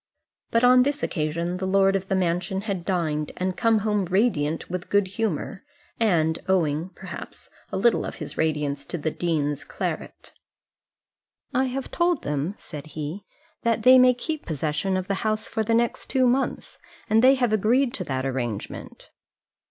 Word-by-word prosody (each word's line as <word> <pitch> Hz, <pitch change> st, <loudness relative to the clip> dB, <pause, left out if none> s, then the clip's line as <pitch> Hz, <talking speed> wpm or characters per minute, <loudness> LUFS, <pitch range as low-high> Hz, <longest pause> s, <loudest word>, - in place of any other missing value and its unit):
But 230 Hz, +1 st, +2 dB
on 250 Hz, 0 st, +7 dB
this 285 Hz, +3 st, 0 dB
occasion 170 Hz, +3 st, -1 dB
the 190 Hz, 0 st, -3 dB
lord 195 Hz, 0 st, +3 dB
of 195 Hz, 0 st, -2 dB
the 195 Hz, -, 0 dB
mansion 180 Hz, +1 st, 0 dB
had 195 Hz, -5 st, -4 dB
dined, 155 Hz, -5 st, -1 dB
and 185 Hz, 0 st, -1 dB
came 230 Hz, 0 st, +3 dB
home 210 Hz, -2 st, 0 dB
radiant 175 Hz, -5 st, +1 dB
with 180 Hz, 0 st, -5 dB
good 205 Hz, -2 st, +2 dB
humour, 195 Hz, -2 st, -3 dB, 0.4 s
and 165 Hz, -7 st, +2 dB
owing, 165 Hz, -2 st, +1 dB
perhaps, -, -, -9 dB, 0.2 s
a 190 Hz, -, -2 dB
little 235 Hz, +4 st, +3 dB
of -, -, -5 dB
his -, -, -7 dB
radiance 150 Hz, -3 st, -1 dB
to 175 Hz, -, -4 dB
the 155 Hz, 0 st, -2 dB
dean's 150 Hz, -5 st, -1 dB
claret. -, -, -5 dB, 1.2 s
"I 260 Hz, +2 st, +2 dB
have 265 Hz, +1 st, -4 dB
told 345 Hz, -3 st, +1 dB
them," 150 Hz, +6 st, -2 dB
said 150 Hz, -1 st, -9 dB
he, 155 Hz, +7 st, -5 dB, 0.4 s
"that 230 Hz, -2 st, 0 dB
they 255 Hz, +2 st, +8 dB
may 250 Hz, 0 st, +6 dB
keep 310 Hz, +4 st, -4 dB
possession 155 Hz, +5 st, -1 dB
of 185 Hz, 0 st, -3 dB
the 200 Hz, -, 0 dB
house 215 Hz, 0 st, -1 dB
for 225 Hz, -, -2 dB
the 225 Hz, +1 st, +1 dB
next 235 Hz, 0 st, 0 dB
two 260 Hz, -1 st, +3 dB
months, 255 Hz, +2 st, -1 dB, 0.3 s
and 225 Hz, +2 st, +3 dB
they 265 Hz, +1 st, +7 dB
have 245 Hz, -4 st, +1 dB
agreed 240 Hz, +5 st, +2 dB
to 185 Hz, -, -3 dB
that 130 Hz, -2 st, -2 dB
arrangement." 120 Hz, -6 st, -5 dB
190 Hz, 170 wpm, -25 LUFS, 160-230 Hz, 1.2 s, they